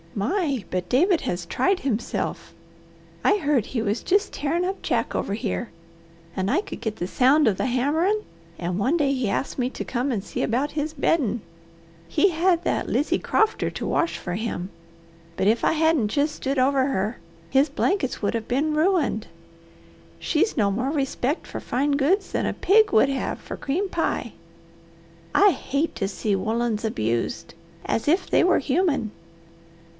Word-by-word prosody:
My, 275 - -1
but 180 -1 -2
David 340 +7 +3
has 180 -8 -3
tried 380 - +1
himself! 240 -4 -3 0.7
I 410 - +4
heard 285 - +1
he 235 - -2
was 210 +2 -1
just 400 +3 +1
tearin' 330 +5 -1
up 385 +1 -3
Jack - - -1
over 200 - -1
here, 225 +1 -3 0.7
and 190 +1 -1
I 380 - +2
could - - -9
get 220 -2 -3
the 175 - -3
sound 270 +7 +4
of 210 - +3
the - - 0
hammerin', 315 - +1 0.3
and 175 +1 -3
one 260 +11 +2
day 280 -3 +2
he 255 -6 -1
asked 270 - -2
me 250 0 +1
to - - -6
come 255 +2 -1
and 210 -6 -2
see - - -4
about 260 +6 0
his 300 +1 -2
beddin'. 270 -6 +1 0.7
He 395 - +3
had 345 0 +2
that - - -1
Lizy 295 - +1
Crofter 440 0 +1
to - - -3
wash 335 - 0
for 175 - -5
him, 190 -3 -3 0.7
but 190 - +1
if 225 +2 +2
I - - +3
hadn't 320 -7 +2
jest 290 +6 0
stood 275 +1 -2
over 265 +1 +3
her 215 -3 -1 0.3
his 275 +2 +3
blankets 290 -1 -1
would 205 - 0
have 225 -1 -3
been 290 +5 0
ruined. 350 +3 +1 0.9
She's 335 +5 0
no 205 -3 +3
more 245 +7 -1
respect 280 0 -1
for - - -6
fine 280 +4 -1
goods 295 +9 +1
than - - 0
a - - -1
pig 420 +2 +4
would 270 +1 +5
have 270 -1 -2
for - - -7
cream 345 +9 -1
pie. 340 -3 -2 1.0
I 405 0 +6
hate 295 -1 -2
to 195 - -1
see 200 +1 -1
woollens 220 +2 -1
abused, 115 - -2 0.3
as 225 - -1
if 360 +5 +2
they - - +4
were 365 0 +4
human. 280 - 0
275 Hz, 175 wpm, -24 LUFS, 225-330 Hz, 1.0 s, I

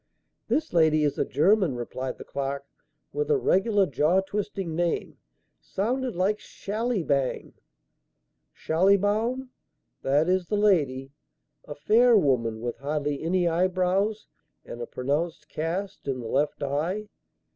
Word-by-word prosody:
"This 315 +1 -1
lady 155 -2 +4
is 145 - 0
a - - +2
German," 180 - +2
replied 130 +2 -5
the - - -9
clerk, 140 0 -4 0.5
"with 445 +1 -2
a 450 - +4
regular 205 - +3
jaw 155 +5 +2
twisting 195 -3 -4
name. 170 0 -1 0.4
Sounded 245 +4 -2
like 195 +4 +1
Shallybang." 200 - -2 1.0
"Schallibaum. 205 +9 +1 0.5
That 145 +4 +2
is 185 -1 +1
the 210 - 0
lady. 140 -10 +2 0.5
A 145 - -7
fair 225 +10 +5
woman 115 - +1
with 120 0 -4
hardly 145 0 -2
any 175 +2 +1
eyebrows 185 +4 +1 0.4
and 120 - -8
a 120 - -4
pronounced 150 +6 -2
cast 185 +5 -4
in 135 -2 -1
the 115 - -6
left 145 +4 0
eye." 165 +10 -2
175 Hz, 125 wpm, -26 LUFS, 140-205 Hz, 1.0 s, fair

